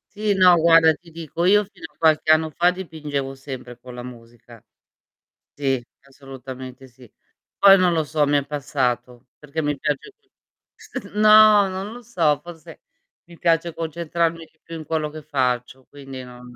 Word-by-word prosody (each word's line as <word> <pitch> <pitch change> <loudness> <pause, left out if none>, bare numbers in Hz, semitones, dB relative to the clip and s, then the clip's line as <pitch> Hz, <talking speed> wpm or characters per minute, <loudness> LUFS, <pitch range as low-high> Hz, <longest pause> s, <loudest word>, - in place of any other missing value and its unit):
Sì, 210 0 0
no, 180 -2 +6
guarda 165 -1 +5
ti 170 +2 -17
dico, 165 +1 -5
io 205 +3 +4
fino 185 -4 -14
a - - -39
qualche 155 -1 +3
anno 160 0 +3
fa 175 +4 +2
dipingevo 150 -7 -5
sempre 130 -3 -9
con 125 0 -12
la 120 0 -8
musica. 120 -2 -14 0.9
Sì, 135 -3 -1 0.2
assolutamente 135 -1 -11
sì. 125 -2 -19 0.5
Poi, 195 -1 +7
non 180 -1 +2
lo 160 -1 +1
so, 150 0 0
mi 145 - +2
è 140 - -2
passato 125 -4 -3
perché 150 +2 -5
mi 145 -1 -2
piace 150 - -3
più 400 - -41 0.5
st - - -9
no, 215 -1 +6
non 190 +3 -6
lo 245 - -10
so, 170 -11 0
forse 165 -2 -12 0.4
mi 170 0 -16
piace 165 0 +1
concentrarmi 165 0 -3
di 160 - -39
più 165 - -10
in 155 - -9
quello 155 -2 -2
che 155 +1 -10
faccio, 130 -3 -2
quindi 135 -2 -10
non 125 0 -13
155 Hz, 170 wpm, -22 LUFS, 135-170 Hz, 0.9 s, Poi